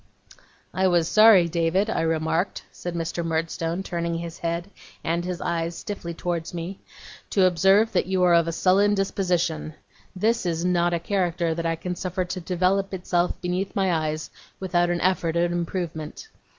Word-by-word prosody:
'I 190 Hz, 0 st, +2 dB
was 175 Hz, -3 st, +2 dB
sorry, 215 Hz, -5 st, +7 dB
David, 170 Hz, +4 st, +1 dB
I 225 Hz, -, -1 dB
remarked,' 160 Hz, +2 st, 0 dB
said 175 Hz, -1 st, -6 dB
Mr. 170 Hz, +1 st, -2 dB
Murdstone, 165 Hz, +2 st, -2 dB
turning 170 Hz, -2 st, -2 dB
his 170 Hz, 0 st, -7 dB
head 170 Hz, +3 st, -3 dB, 0.3 s
and 170 Hz, +1 st, 0 dB
his 180 Hz, -1 st, -4 dB
eyes 170 Hz, 0 st, -2 dB
stiffly 195 Hz, -4 st, -5 dB
towards 170 Hz, 0 st, -3 dB
me, 175 Hz, +3 st, -5 dB, 0.5 s
'to 190 Hz, -2 st, +3 dB
observe 195 Hz, +5 st, +4 dB
that -, -, +1 dB
you 190 Hz, -1 st, +1 dB
are 175 Hz, -1 st, +5 dB
of 170 Hz, -1 st, +4 dB
a -, -, 0 dB
sullen 195 Hz, +4 st, +3 dB
disposition. 180 Hz, -5 st, -1 dB, 0.4 s
This 225 Hz, +5 st, +1 dB
is 170 Hz, 0 st, -1 dB
not 175 Hz, -1 st, +2 dB
a -, -, -1 dB
character 175 Hz, -2 st, 0 dB
that 165 Hz, +1 st, -2 dB
I 165 Hz, -, 0 dB
can 180 Hz, +2 st, -4 dB
suffer 185 Hz, +1 st, -2 dB
to 180 Hz, -, -4 dB
develop 185 Hz, +3 st, 0 dB
itself 175 Hz, -1 st, 0 dB
beneath 180 Hz, +2 st, -2 dB
my 190 Hz, -2 st, +2 dB
eyes 155 Hz, -1 st, -2 dB, 0.3 s
without 175 Hz, -2 st, +1 dB
an 175 Hz, 0 st, 0 dB
effort 175 Hz, -3 st, +1 dB
at 170 Hz, 0 st, +2 dB
improvement. 170 Hz, -, -4 dB
175 Hz, 170 wpm, -24 LUFS, 165-185 Hz, 0.5 s, sorry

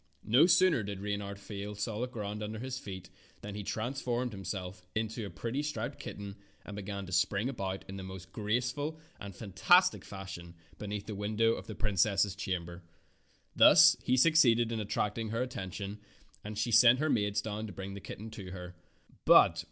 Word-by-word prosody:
No 125 Hz, -, +6 dB
sooner 185 Hz, -7 st, +5 dB
did 100 Hz, -1 st, -5 dB
Reynard 100 Hz, 0 st, -4 dB
feel 100 Hz, 0 st, -6 dB
solid 110 Hz, +4 st, -3 dB
ground 105 Hz, -3 st, -5 dB
under 105 Hz, +1 st, -4 dB
his 130 Hz, +2 st, -5 dB
feet 95 Hz, -4 st, -9 dB, 0.3 s
than 105 Hz, -, -7 dB
he 105 Hz, -, -5 dB
transformed 120 Hz, +3 st, -2 dB
himself 95 Hz, -1 st, -5 dB
into 110 Hz, 0 st, -2 dB
a -, -, -8 dB
pretty 120 Hz, +7 st, -3 dB
striped 135 Hz, -7 st, -4 dB
kitten 100 Hz, 0 st, -7 dB, 0.3 s
and 105 Hz, -, -8 dB
began 100 Hz, -1 st, -5 dB
to 90 Hz, -, -10 dB
spring 95 Hz, +7 st, +1 dB
about 95 Hz, -7 st, -4 dB
in 95 Hz, 0 st, -7 dB
the -, -, -6 dB
most 95 Hz, 0 st, -9 dB
graceful 125 Hz, +9 st, -2 dB, 0.2 s
and 100 Hz, -2 st, -8 dB
fantastic 175 Hz, -, +3 dB
fashion 95 Hz, -3 st, -9 dB, 0.2 s
beneath 105 Hz, -1 st, -5 dB
the 110 Hz, -, -5 dB
window 110 Hz, +3 st, +1 dB
of -, -, -7 dB
the 110 Hz, -, -6 dB
princess's 100 Hz, -1 st, +1 dB
chamber. 90 Hz, -3 st, -4 dB, 0.7 s
Thus -, -, +8 dB
he 130 Hz, -, +1 dB
succeeded 120 Hz, -6 st, +5 dB
in 115 Hz, -, -2 dB
attracting 105 Hz, +1 st, -2 dB
her 115 Hz, +3 st, -1 dB
attention, 100 Hz, -3 st, -6 dB, 0.4 s
and 105 Hz, 0 st, -7 dB
she 115 Hz, +2 st, -1 dB
sent 120 Hz, +2 st, +7 dB
her 155 Hz, +3 st, 0 dB
maids 105 Hz, -2 st, +1 dB
down 110 Hz, 0 st, -4 dB
to -, -, -8 dB
bring 95 Hz, +2 st, -7 dB
the 100 Hz, -, -8 dB
kitten 110 Hz, +3 st, -8 dB
to 95 Hz, -4 st, -8 dB
her. 90 Hz, -1 st, -8 dB
105 Hz, 175 wpm, -31 LUFS, 100-115 Hz, 0.7 s, Thus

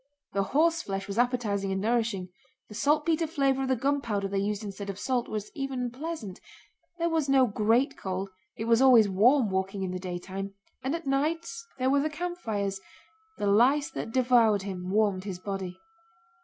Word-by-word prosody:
(The 200 Hz, -, +1 dB
horseflesh 280 Hz, -6 st, +1 dB
was 200 Hz, +3 st, -3 dB
appetizing 220 Hz, -6 st, 0 dB
and 190 Hz, -, -1 dB
nourishing, 220 Hz, -4 st, 0 dB, 0.4 s
the -, -, -10 dB
saltpeter 310 Hz, +6 st, +1 dB
flavor 275 Hz, -4 st, +1 dB
of 265 Hz, -, -1 dB
the 260 Hz, -, +2 dB
gunpowder 235 Hz, -6 st, 0 dB
they 195 Hz, 0 st, -1 dB
used 205 Hz, +1 st, -2 dB
instead 200 Hz, 0 st, -6 dB
of 195 Hz, -, -4 dB
salt 250 Hz, +2 st, -1 dB
was 210 Hz, -1 st, -5 dB
even 265 Hz, -3 st, -3 dB
pleasant; 260 Hz, -, -6 dB, 0.6 s
there 335 Hz, -1 st, 0 dB
was 315 Hz, -4 st, 0 dB
no 270 Hz, -1 st, +5 dB
great 225 Hz, +4 st, +2 dB
cold, 190 Hz, +1 st, -4 dB, 0.2 s
it 225 Hz, -, -4 dB
was 230 Hz, +1 st, +4 dB
always 245 Hz, -5 st, +7 dB
warm 220 Hz, +4 st, +4 dB
walking 190 Hz, +1 st, -1 dB
in 185 Hz, -, -2 dB
the 185 Hz, -, -4 dB
daytime, 190 Hz, +2 st, -5 dB, 0.3 s
and 265 Hz, +5 st, -1 dB
at 335 Hz, -2 st, -6 dB
night 300 Hz, +5 st, 0 dB, 0.3 s
there 260 Hz, 0 st, +1 dB
were 280 Hz, 0 st, +3 dB
the 305 Hz, -, 0 dB
campfires; 225 Hz, -, -3 dB, 0.6 s
the -, -, -2 dB
lice 265 Hz, +10 st, +4 dB
that -, -, -5 dB
devoured 235 Hz, -5 st, +4 dB
him 185 Hz, -2 st, -5 dB
warmed 200 Hz, -2 st, +1 dB
his 195 Hz, -3 st, -5 dB
body.) 190 Hz, -1 st, -5 dB
225 Hz, 175 wpm, -28 LUFS, 195-275 Hz, 0.6 s, always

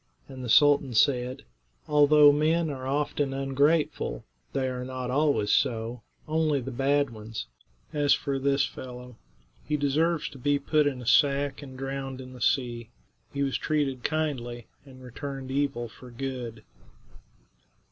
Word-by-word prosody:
And 130 Hz, -1 st, -9 dB
the 125 Hz, -, -5 dB
sultan 145 Hz, -1 st, +5 dB
said: 125 Hz, +2 st, +2 dB, 0.4 s
"Although 150 Hz, 0 st, +7 dB
men 155 Hz, +2 st, +1 dB
are 130 Hz, -2 st, -6 dB
often 145 Hz, 0 st, -1 dB
ungrateful, 140 Hz, +4 st, 0 dB, 0.3 s
they 135 Hz, -1 st, -1 dB
are 125 Hz, -1 st, -3 dB
not 130 Hz, -1 st, -4 dB
always 140 Hz, -7 st, +2 dB
so; 115 Hz, +1 st, 0 dB, 0.3 s
only 155 Hz, -2 st, +1 dB
the 135 Hz, +1 st, -6 dB
bad 140 Hz, +1 st, +1 dB
ones. 110 Hz, -, -7 dB, 0.5 s
As 145 Hz, -1 st, +2 dB
for 140 Hz, -1 st, +1 dB
this 140 Hz, 0 st, +2 dB
fellow, 125 Hz, -1 st, -9 dB, 0.4 s
he 150 Hz, 0 st, -1 dB
deserves 150 Hz, +2 st, +1 dB
to 135 Hz, -, -13 dB
be 145 Hz, +3 st, +2 dB
put 150 Hz, +1 st, +2 dB
in 130 Hz, -3 st, -3 dB
a -, -, -10 dB
sack 140 Hz, +2 st, +3 dB
and 130 Hz, -2 st, -10 dB
drowned 135 Hz, 0 st, -4 dB
in 130 Hz, 0 st, -9 dB
the 125 Hz, -, -12 dB
sea. 120 Hz, -2 st, 0 dB, 0.4 s
He 140 Hz, 0 st, -1 dB
was 135 Hz, -1 st, -1 dB
treated 140 Hz, -5 st, -1 dB
kindly, 130 Hz, -7 st, -2 dB, 0.2 s
and 130 Hz, -1 st, -14 dB
returned 135 Hz, +1 st, -6 dB
evil 135 Hz, -3 st, -1 dB
for 125 Hz, +3 st, -14 dB
good." 120 Hz, -2 st, -6 dB
135 Hz, 145 wpm, -27 LUFS, 125-145 Hz, 0.5 s, Although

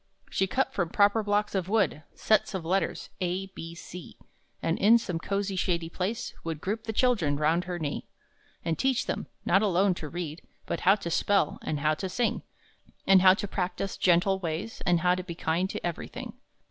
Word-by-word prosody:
She 190 Hz, -, +1 dB
cut 260 Hz, +7 st, 0 dB
from 175 Hz, -4 st, -1 dB
proper 205 Hz, +4 st, +4 dB
blocks 205 Hz, 0 st, 0 dB
of 190 Hz, -2 st, -1 dB
wood 200 Hz, -8 st, +2 dB
Sets 215 Hz, -2 st, +2 dB
of 185 Hz, -, -3 dB
the -, -, -7 dB
letters: 190 Hz, -2 st, -1 dB
A, 185 Hz, +1 st, -1 dB
B, 165 Hz, +1 st, -8 dB
C; 175 Hz, 0 st, -10 dB, 0.4 s
And 165 Hz, -, -1 dB
in 225 Hz, +4 st, +7 dB
some 180 Hz, -7 st, -3 dB
cosy 195 Hz, +2 st, -2 dB
shady 170 Hz, -3 st, 0 dB
place 195 Hz, +7 st, -3 dB
Would 165 Hz, -2 st, -4 dB
group 215 Hz, +6 st, -3 dB
the 220 Hz, -, -2 dB
children 215 Hz, -, +2 dB
round 160 Hz, +4 st, +2 dB
her 180 Hz, -1 st, -3 dB
knee 150 Hz, -4 st, -4 dB, 0.6 s
And 165 Hz, -1 st, -1 dB
teach 265 Hz, -2 st, +1 dB
them -, -, -3 dB, 0.2 s
not 195 Hz, -, +4 dB
alone 195 Hz, -1 st, +3 dB
to 155 Hz, -3 st, -7 dB
read, 165 Hz, -2 st, -5 dB, 0.2 s
But -, -, -2 dB
how 195 Hz, +3 st, +5 dB
to 170 Hz, -5 st, -5 dB
spell, 200 Hz, +4 st, +2 dB
and 150 Hz, -2 st, -3 dB
how 155 Hz, +1 st, +3 dB
to 190 Hz, +4 st, -4 dB
sing; 235 Hz, +6 st, 0 dB, 0.6 s
And 195 Hz, -1 st, +6 dB
how 185 Hz, 0 st, +7 dB
to 205 Hz, -, -4 dB
practice 190 Hz, 0 st, -2 dB
gentle 190 Hz, +2 st, +3 dB
ways, 175 Hz, +5 st, -4 dB
And 175 Hz, -1 st, +4 dB
to 180 Hz, 0 st, +2 dB
be 170 Hz, -2 st, -7 dB
kind 170 Hz, +3 st, 0 dB
to -, -, -5 dB
everything. 170 Hz, -2 st, -5 dB
185 Hz, 195 wpm, -28 LUFS, 170-200 Hz, 0.6 s, in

